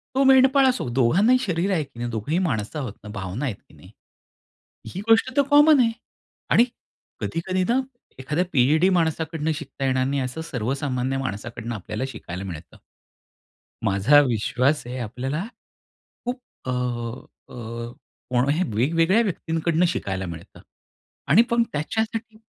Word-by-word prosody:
तो 270 Hz, -, +4 dB
मेंढपाळ 265 Hz, +1 st, +6 dB
असो 250 Hz, -, -1 dB
दोघांनाही 160 Hz, -, +4 dB
शरीर 180 Hz, -2 st, 0 dB
आहे 160 Hz, -4 st, +1 dB
की 125 Hz, -4 st, -15 dB
नाही? 120 Hz, 0 st, -2 dB
दोघंही 115 Hz, +8 st, -2 dB
माणसं 140 Hz, -, -2 dB
आहोत 125 Hz, -8 st, -4 dB
ना, 105 Hz, -, -9 dB
भावना 100 Hz, +5 st, -4 dB
आहेत 120 Hz, -7 st, -2 dB
की -, -, -22 dB
नाही? -, -, -16 dB, 1.0 s
ही 185 Hz, -, -3 dB
गोष्ट 225 Hz, +3 st, +5 dB
तर 285 Hz, -, +6 dB
कॉमन 295 Hz, 0 st, +7 dB
आहे 230 Hz, -2 st, +3 dB, 0.6 s
आणि 235 Hz, -, +6 dB, 0.6 s
कधी-कधी 185 Hz, +3 st, -1 dB
ना 245 Hz, +3 st, +3 dB, 0.4 s
एखाद्या 150 Hz, +7 st, -1 dB
पी-एच-डी 150 Hz, +7 st, +4 dB
माणसाकडनं 160 Hz, -1 st, 0 dB
शिकता 140 Hz, -3 st, -6 dB
येणार 130 Hz, -1 st, +2 dB
नाही 140 Hz, +1 st, 0 dB
असं 130 Hz, +5 st, -4 dB
सर्वसामान्य 130 Hz, +1 st, -2 dB
माणसाकडनं 115 Hz, 0 st, -5 dB
आपल्याला 105 Hz, +4 st, -4 dB
शिकायला 95 Hz, -6 st, -7 dB
मिळतं. 85 Hz, -4 st, -8 dB, 1.1 s
माझा 100 Hz, +10 st, +5 dB
विश्वास 125 Hz, +5 st, +1 dB
आहे 125 Hz, +1 st, -5 dB
आपल्याला, 130 Hz, -, -3 dB, 0.8 s
खूप 245 Hz, +1 st, -3 dB, 0.3 s
अ, -, -, -4 dB
अ, 120 Hz, -1 st, -5 dB, 0.4 s
कोण्याही 140 Hz, +7 st, +2 dB
वेगवेगळ्या 165 Hz, -, +3 dB
व्यक्तींकडून 165 Hz, -3 st, 0 dB
शिकायला 95 Hz, -, -2 dB
मिळतं 85 Hz, -1 st, -10 dB, 0.7 s
आणि 175 Hz, +11 st, +7 dB
पण 235 Hz, 0 st, +3 dB
त्याच्यासाठी 220 Hz, +8 st, -2 dB
140 Hz, 135 wpm, -24 LUFS, 120-180 Hz, 1.1 s, कॉमन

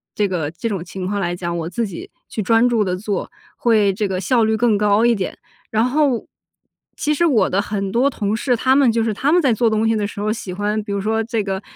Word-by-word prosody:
这 210 Hz, -, +1 dB
个 170 Hz, -6 st, -2 dB
这 200 Hz, +7 st, -4 dB
种 195 Hz, -5 st, -3 dB
情 185 Hz, +1 st, -6 dB
况 205 Hz, +1 st, -2 dB
来 175 Hz, -2 st, -1 dB
讲， 170 Hz, -1 st, -3 dB
我 165 Hz, 0 st, -3 dB
自 230 Hz, +6 st, -2 dB
己 185 Hz, -, -8 dB, 0.2 s
去 220 Hz, -, -3 dB
专 225 Hz, +4 st, +4 dB
注 230 Hz, -3 st, +2 dB
地 180 Hz, -1 st, -1 dB
做， 200 Hz, 0 st, -3 dB, 0.3 s
会 215 Hz, -4 st, +3 dB
这 210 Hz, +1 st, -1 dB
个 190 Hz, -1 st, -3 dB
效 235 Hz, +5 st, +2 dB
率 220 Hz, 0 st, +1 dB
更 220 Hz, -2 st, +2 dB
高 210 Hz, +2 st, +3 dB
一 240 Hz, -, +4 dB
点。 190 Hz, -3 st, -4 dB, 0.3 s
然 220 Hz, +1 st, +2 dB
后 290 Hz, +5 st, +2 dB
我 245 Hz, -4 st, -2 dB, 0.7 s
其 300 Hz, -, 0 dB
实 340 Hz, +3 st, +2 dB
我 235 Hz, -, +3 dB
的 195 Hz, -, +1 dB
很 200 Hz, -2 st, -3 dB
多 245 Hz, +6 st, +3 dB
同 210 Hz, -6 st, -2 dB
事， 245 Hz, +2 st, +1 dB
他 260 Hz, +3 st, +3 dB
们 275 Hz, -3 st, +5 dB
就 230 Hz, 0 st, +1 dB
是 220 Hz, -1 st, 0 dB
他 275 Hz, +9 st, +1 dB
们 355 Hz, -, +5 dB
在 265 Hz, -6 st, +3 dB
做 230 Hz, +1 st, +2 dB
东 220 Hz, 0 st, +1 dB
西 225 Hz, -, +2 dB
的 210 Hz, -2 st, -1 dB
时 205 Hz, -, -7 dB
候 215 Hz, +1 st, 0 dB
喜 210 Hz, -4 st, -5 dB
欢 205 Hz, +3 st, -1 dB
比 205 Hz, -1 st, -5 dB
如 200 Hz, -, -1 dB
说 220 Hz, +2 st, 0 dB
这 225 Hz, -2 st, -1 dB
个 195 Hz, -1 st, -3 dB
215 Hz, 285 characters per minute, -20 LUFS, 195-235 Hz, 0.7 s, 们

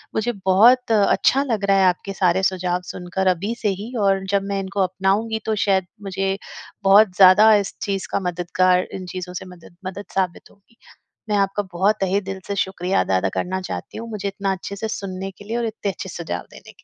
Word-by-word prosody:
मुझे 225 Hz, +2 st, 0 dB
बहुत 230 Hz, +6 st, +5 dB
अच्छा 225 Hz, +5 st, +3 dB
लग 225 Hz, -7 st, -1 dB
रहा 195 Hz, 0 st, +4 dB
है 190 Hz, -, +4 dB
आपके 185 Hz, +2 st, 0 dB
सारे 190 Hz, 0 st, +2 dB
सुझाव 180 Hz, -1 st, 0 dB
सुनकर 180 Hz, +2 st, -3 dB
अभी 185 Hz, +5 st, +1 dB
से 210 Hz, -, +1 dB
ही 225 Hz, +4 st, -7 dB
और 195 Hz, -1 st, +2 dB
जब 200 Hz, -1 st, +2 dB
मैं 200 Hz, -, 0 dB
इनको 195 Hz, +1 st, -2 dB
अपनाऊँगी 195 Hz, +4 st, 0 dB
तो 220 Hz, -, 0 dB
शायद 190 Hz, -2 st, +2 dB, 0.2 s
मुझे 195 Hz, 0 st, -2 dB, 0.5 s
बहुत 195 Hz, 0 st, +6 dB
ज़्यादा 200 Hz, +4 st, +7 dB
इस 200 Hz, -1 st, -1 dB
चीज़ 195 Hz, -2 st, -2 dB
का -, -, +1 dB
मददगार 180 Hz, 0 st, +1 dB
इन 185 Hz, -, -6 dB
चीज़ों 180 Hz, 0 st, -5 dB
से 180 Hz, -, -6 dB
मदद 180 Hz, -2 st, -14 dB
मदद 195 Hz, +2 st, -6 dB
साबित 185 Hz, -3 st, -2 dB
होगी। 200 Hz, +3 st, -28 dB, 0.5 s
मैं 210 Hz, -, +2 dB
आपका 195 Hz, +1 st, 0 dB
बहुत 195 Hz, +5 st, +2 dB
तहे 195 Hz, +1 st, +1 dB
दिल 195 Hz, 0 st, -6 dB
से 200 Hz, -, -2 dB
शुक्रिया 190 Hz, -1 st, 0 dB
दा 95 Hz, -, +1 dB
अदा 95 Hz, +1 st, 0 dB
करना 190 Hz, +1 st, -2 dB
चाहती 185 Hz, -, -6 dB
हूँ, 230 Hz, +1 st, -7 dB
मुझे 210 Hz, -3 st, -4 dB
इतना 195 Hz, 0 st, -2 dB
अच्छे 190 Hz, +1 st, -6 dB
से 220 Hz, +3 st, -4 dB
सुनने 195 Hz, -2 st, -5 dB
के 200 Hz, -, -15 dB
लिए 225 Hz, +3 st, -3 dB
और 240 Hz, -, -1 dB
इतने 215 Hz, -2 st, -3 dB
अच्छे 190 Hz, -, -8 dB
सुझाव 165 Hz, -, -4 dB
देने -, -, -13 dB
के -, -, -24 dB
195 Hz, 210 wpm, -21 LUFS, 185-205 Hz, 0.5 s, ज़्यादा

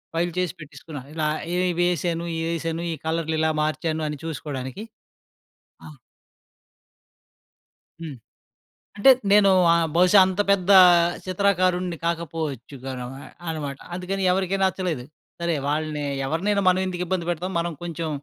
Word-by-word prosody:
File 175 Hz, +1 st, 0 dB
చేసి 180 Hz, -2 st, -1 dB
పెట్టేసుకున్నా. 145 Hz, -1 st, -9 dB
ఇలా 155 Hz, -2 st, -1 dB, 0.3 s
ఏమి 180 Hz, 0 st, +1 dB
వేశాను, 170 Hz, -1 st, 0 dB
ఏ -, -, -2 dB
యేశాను, 165 Hz, 0 st, -3 dB
ఈ -, -, -4 dB
కలర్లిలా 160 Hz, -1 st, 0 dB
మార్చాను 155 Hz, +1 st, -1 dB
అని 150 Hz, -, -5 dB
చూసుకోడానికి. 145 Hz, +2 st, -5 dB, 1.0 s
ఆ! -, -, -10 dB, 2.2 s
హ్మ్. 155 Hz, -5 st, -6 dB, 0.8 s
అంటే, 235 Hz, +6 st, +6 dB, 0.2 s
నేనూ 200 Hz, -1 st, +6 dB, 0.2 s
ఆహ్, 170 Hz, -1 st, +3 dB
బహుశా 180 Hz, +3 st, +6 dB
అంత 190 Hz, +2 st, -2 dB
పెద్దా 195 Hz, 0 st, +5 dB, 0.5 s
చిత్రాకారుడిని 185 Hz, -2 st, +1 dB
కాకపోవచ్చు 160 Hz, -6 st, -3 dB
గా 135 Hz, -, -4 dB
ర -, -, -5 dB
మా 135 Hz, -, -10 dB, 0.3 s
అనమాట 145 Hz, -4 st, -4 dB, 0.2 s
అందుకని 190 Hz, +2 st, -3 dB
ఎవరికీ 190 Hz, +1 st, 0 dB
నచ్చలేదు. 185 Hz, -8 st, -1 dB, 0.4 s
సరే 170 Hz, -1 st, 0 dB
వాళ్ళని 150 Hz, 0 st, -2 dB, 0.2 s
ఎవరినైనా 195 Hz, +7 st, 0 dB
మనవెందుకు 185 Hz, -1 st, 0 dB
ఇబ్బంది 175 Hz, -1 st, -2 dB
పెడతాం, 180 Hz, +3 st, -3 dB
మనం 170 Hz, 0 st, -1 dB
కొంచెం 165 Hz, -1 st, -4 dB
170 Hz, 125 wpm, -24 LUFS, 155-185 Hz, 2.2 s, అంటే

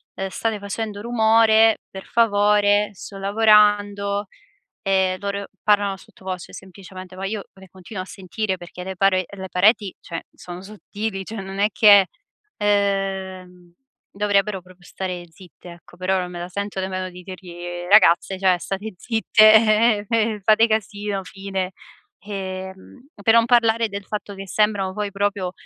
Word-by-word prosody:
uhm: 195 Hz, -, -3 dB
"State 215 Hz, +2 st, -3 dB
facendo 205 Hz, +1 st, -5 dB
rumore, 225 Hz, -1 st, +4 dB
per 190 Hz, 0 st, -9 dB
favore, 205 Hz, -2 st, +3 dB
sto 200 Hz, 0 st, -10 dB
lavorando," 205 Hz, -1 st, +3 dB, 0.6 s
ehm, 190 Hz, -1 st, +1 dB
loro 200 Hz, 0 st, -4 dB
parlano 205 Hz, -2 st, +2 dB
sottovoce, 185 Hz, -2 st, -9 dB
semplicemente, 185 Hz, -1 st, -11 dB
ma 195 Hz, -, -4 dB
io 205 Hz, 0 st, -4 dB
le 190 Hz, -1 st, -16 dB
continuo 185 Hz, +1 st, -8 dB
a 185 Hz, -, -11 dB
sentire, 190 Hz, +1 st, -4 dB
perché 175 Hz, 0 st, -10 dB
le 190 Hz, +1 st, -6 dB
parue 185 Hz, -1 st, +2 dB
le 190 Hz, -2 st, -8 dB
pareti, 200 Hz, +1 st, +2 dB
cioè, 165 Hz, -, -7 dB
sono 180 Hz, +1 st, -10 dB
sottili, 210 Hz, 0 st, -6 dB
cioè, 205 Hz, +1 st, -7 dB
non 195 Hz, 0 st, -8 dB
è 205 Hz, +1 st, +3 dB
che, 200 Hz, -1 st, +6 dB, 0.5 s
ehm, 190 Hz, -3 st, -2 dB, 0.4 s
dovrebbero 200 Hz, -1 st, 0 dB
proprio 180 Hz, 0 st, -19 dB
stare 180 Hz, -1 st, -5 dB
zitte, 175 Hz, +1 st, -15 dB
ecco, 170 Hz, -, -19 dB
però 185 Hz, +1 st, 0 dB
non 180 Hz, -, -3 dB
me 175 Hz, -, -7 dB
la 175 Hz, -, -5 dB
sento 200 Hz, +1 st, -4 dB
nemmeno 185 Hz, 0 st, -3 dB
di 180 Hz, 0 st, -12 dB
dirgli: 185 Hz, -1 st, -10 dB, 0.3 s
"Ragazze, 190 Hz, -2 st, +5 dB
cioè 185 Hz, -2 st, +3 dB
state 195 Hz, +4 st, -5 dB
zitte, 215 Hz, 0 st, +4 dB, 0.4 s
fate 220 Hz, +3 st, +5 dB
casino". 205 Hz, -2 st, -2 dB
Fine. 195 Hz, 0 st, -5 dB, 0.6 s
Ehm, 190 Hz, +4 st, -7 dB, 0.2 s
per 225 Hz, +2 st, +4 dB
non 230 Hz, 0 st, +6 dB
parlare 230 Hz, -1 st, +3 dB
del 200 Hz, -1 st, -7 dB
fatto 210 Hz, -1 st, -5 dB
che 195 Hz, 0 st, -9 dB
sembrano 205 Hz, -2 st, +1 dB
poi, 205 Hz, -1 st, -3 dB
proprio, 200 Hz, -2 st, -1 dB
200 Hz, 145 wpm, -22 LUFS, 185-210 Hz, 0.6 s, che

